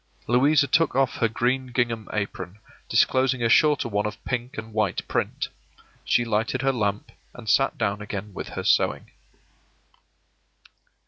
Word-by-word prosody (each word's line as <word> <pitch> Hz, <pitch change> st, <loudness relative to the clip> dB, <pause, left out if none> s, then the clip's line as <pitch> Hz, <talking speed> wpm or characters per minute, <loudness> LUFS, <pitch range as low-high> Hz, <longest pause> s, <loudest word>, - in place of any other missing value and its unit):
Louisa 140 Hz, +5 st, +4 dB
took 155 Hz, +1 st, +2 dB
off 135 Hz, -2 st, +1 dB
her 115 Hz, -, +2 dB
green 125 Hz, +3 st, 0 dB
gingham 115 Hz, -3 st, -1 dB
apron, 100 Hz, -2 st, -4 dB, 0.3 s
disclosing 130 Hz, -1 st, +2 dB
a 115 Hz, -, +2 dB
shorter 150 Hz, +1 st, +4 dB
one 105 Hz, -1 st, -1 dB
of 105 Hz, -, -9 dB
pink 125 Hz, +2 st, -3 dB
and 110 Hz, 0 st, -7 dB
white 105 Hz, -4 st, -1 dB
print. -, -, -2 dB, 0.5 s
She 120 Hz, -, +2 dB
lighted 115 Hz, +3 st, -1 dB
her 135 Hz, 0 st, +2 dB
lamp, 105 Hz, -4 st, -2 dB, 0.2 s
and 120 Hz, -3 st, -11 dB
sat 135 Hz, +6 st, +2 dB
down 100 Hz, +1 st, -1 dB
again 105 Hz, 0 st, -6 dB
with -, -, -6 dB
her -, -, -2 dB
sewing. -, -, +1 dB
120 Hz, 145 wpm, -25 LUFS, 105-130 Hz, 0.5 s, Louisa